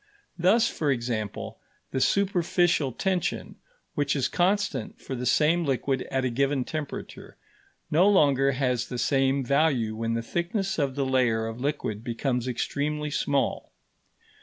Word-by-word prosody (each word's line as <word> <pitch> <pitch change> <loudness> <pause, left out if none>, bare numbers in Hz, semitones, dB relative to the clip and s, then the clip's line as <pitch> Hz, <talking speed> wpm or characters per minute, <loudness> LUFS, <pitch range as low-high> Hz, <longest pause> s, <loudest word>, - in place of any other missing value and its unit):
Thus, 205 +7 +4
for 150 -9 -2
example, 115 -5 -3 0.3
the 130 - -1
superficial 175 -6 +2
tension, 185 +8 -2 0.4
which 145 -1 0
is 130 -3 +1
constant 205 +5 0
for - - -7
the 125 -1 -3
same 160 +6 +3
liquid 135 -2 -1
at 130 -1 0
a 125 - 0
given 135 +2 +1
temperature, 155 -3 -6 0.5
no 180 +6 +5
longer 140 -7 +4
has 125 -2 0
the 125 - -5
same 135 +2 +1
value 135 -5 +2
when 115 +1 -2
the 115 - -2
thickness 190 - -2
of 140 -3 0
the 140 -1 0
layer 125 -4 +2
of 115 +2 -6
liquid 135 -7 -2
becomes 125 +1 -2
extremely 150 +4 -2
small. 140 -3 -1
140 Hz, 140 wpm, -26 LUFS, 125-160 Hz, 0.5 s, no